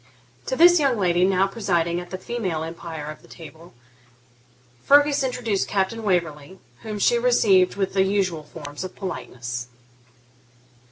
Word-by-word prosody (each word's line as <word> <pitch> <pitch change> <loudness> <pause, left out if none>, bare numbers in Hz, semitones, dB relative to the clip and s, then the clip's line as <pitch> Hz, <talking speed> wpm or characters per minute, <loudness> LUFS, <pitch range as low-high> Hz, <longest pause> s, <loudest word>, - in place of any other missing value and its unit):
To - - -1
this 345 +3 +6
young 275 -5 +2
lady, 180 -3 +2
now 190 0 +2
presiding 175 -5 -1
at 175 - -9
the 185 - -5
female 185 -6 -3
empire 165 -2 -7
of 155 - -13
the - - -19
tea 170 - -13
table, 165 -1 -18 1.1
Fergus 285 0 +4
introduced 240 -6 -1
Captain 200 +3 -1
Waverley, 170 -4 -2 0.2
whom 215 -2 -6
she 235 +4 +2
received 200 -7 +3
with 195 -1 -2
the 195 - +2
usual 190 -4 0
forms 145 +1 -9
of 185 - -8
politeness. 125 - -6
190 Hz, 150 wpm, -23 LUFS, 170-225 Hz, 1.1 s, this